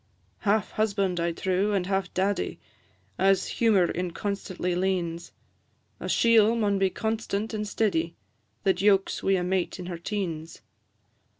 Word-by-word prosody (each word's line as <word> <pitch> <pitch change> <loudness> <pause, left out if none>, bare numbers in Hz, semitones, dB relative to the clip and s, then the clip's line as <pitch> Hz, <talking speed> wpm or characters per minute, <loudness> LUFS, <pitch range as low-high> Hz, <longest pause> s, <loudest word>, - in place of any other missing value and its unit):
Half 210 -1 +1
husband, 200 -4 0
I 170 0 +1
trow, 190 +4 0
and 190 -3 +1
half 195 -1 -1
daddy, 195 +2 0 0.6
As 195 0 +3
humour 205 -7 +3
inconstantly 180 0 -3
leans; 175 -2 -1 0.7
A - - -5
chiel 230 -1 +5
maun 205 -3 +1
be 195 -1 +3
constant 220 +1 -2
and 210 -1 -2
steady, 170 -7 0 0.5
That 190 -2 +2
yokes 195 -1 +3
wi' 195 - +2
a 185 -2 +1
mate 185 0 -1
in 180 - -7
her 175 -2 -5
teens. 170 -4 -4
195 Hz, 135 wpm, -27 LUFS, 180-205 Hz, 0.7 s, chiel